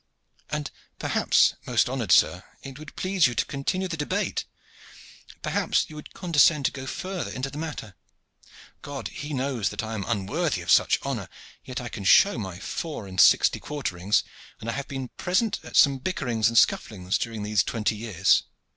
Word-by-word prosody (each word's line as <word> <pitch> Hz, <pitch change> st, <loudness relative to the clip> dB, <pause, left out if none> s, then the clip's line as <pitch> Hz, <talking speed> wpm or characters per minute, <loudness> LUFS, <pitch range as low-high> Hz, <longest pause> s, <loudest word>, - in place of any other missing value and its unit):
"And 150 Hz, -1 st, -3 dB, 0.3 s
perhaps, -, -, +3 dB
most -, -, +2 dB
honored -, -, -2 dB
sir, -, -, +4 dB, 0.2 s
it 135 Hz, +1 st, -9 dB
would 155 Hz, -2 st, -11 dB
please 185 Hz, -5 st, +2 dB
you 120 Hz, -, -4 dB
to -, -, +1 dB
continue 185 Hz, +7 st, -2 dB
the 175 Hz, -, -4 dB
debate. 150 Hz, -2 st, -2 dB, 1.0 s
Perhaps -, -, 0 dB
you -, -, -10 dB
would 150 Hz, -, -10 dB
condescend 155 Hz, -4 st, +3 dB
to -, -, +2 dB
go 135 Hz, -1 st, -8 dB
farther 185 Hz, +2 st, -4 dB
into 130 Hz, +1 st, -4 dB
the 145 Hz, -, -7 dB
matter. 145 Hz, -10 st, -6 dB, 0.9 s
God 140 Hz, -2 st, -6 dB
He 150 Hz, +1 st, -7 dB
knows 130 Hz, -6 st, -1 dB
that -, -, -4 dB
I 110 Hz, 0 st, -5 dB
am 105 Hz, -3 st, -3 dB
unworthy 115 Hz, -, -1 dB
of 85 Hz, -, -1 dB
such -, -, +5 dB
honor, -, -, -4 dB, 0.3 s
yet 125 Hz, -, -5 dB
I 120 Hz, -, -5 dB
can 100 Hz, -, -7 dB
show 130 Hz, -, +5 dB
my 95 Hz, -4 st, -5 dB
four 150 Hz, -, -5 dB
and 95 Hz, -2 st, +1 dB
sixty -, -, +5 dB
quarterings, 105 Hz, -9 st, -1 dB, 0.4 s
and 110 Hz, -, -8 dB
I 115 Hz, -, -1 dB
have 140 Hz, +2 st, -4 dB
been 135 Hz, -2 st, -5 dB
present 195 Hz, +4 st, 0 dB
at -, -, -10 dB
some 140 Hz, -2 st, +5 dB
bickerings 125 Hz, -9 st, 0 dB
and 115 Hz, -, -1 dB
scufflings 95 Hz, -4 st, +2 dB
during 115 Hz, -3 st, -4 dB
these 105 Hz, -1 st, +2 dB
twenty 110 Hz, +1 st, -1 dB
years." 105 Hz, -4 st, +2 dB
130 Hz, 180 wpm, -26 LUFS, 110-150 Hz, 1.0 s, such